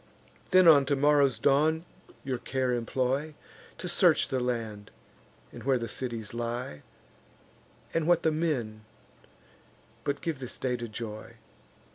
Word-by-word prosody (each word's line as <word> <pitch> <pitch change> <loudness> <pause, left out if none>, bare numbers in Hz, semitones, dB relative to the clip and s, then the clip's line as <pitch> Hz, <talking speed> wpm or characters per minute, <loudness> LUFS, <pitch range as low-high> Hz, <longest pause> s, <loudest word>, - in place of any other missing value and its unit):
Then, 185 -1 +6
on 140 -4 +7
tomorrow's 140 -1 +3
dawn, 155 +4 +2 0.4
your 130 -3 -3
care 130 -1 -1
employ, 130 +5 -1 0.4
To - - -5
search - - +4
the 130 - 0
land, 115 -4 -3 0.6
and - - -10
where 135 -1 +2
the 115 -1 -4
cities 115 -5 -5
lie, 120 - -4 1.1
And 165 -1 0
what 175 -1 +3
the 160 - +3
men; 130 -10 -2 1.2
but 140 - -2
give 160 -5 -3
this 125 -2 -6
day 125 -1 -1
to 120 -1 -5
joy. 110 -1 -7
130 Hz, 130 wpm, -29 LUFS, 120-150 Hz, 1.2 s, on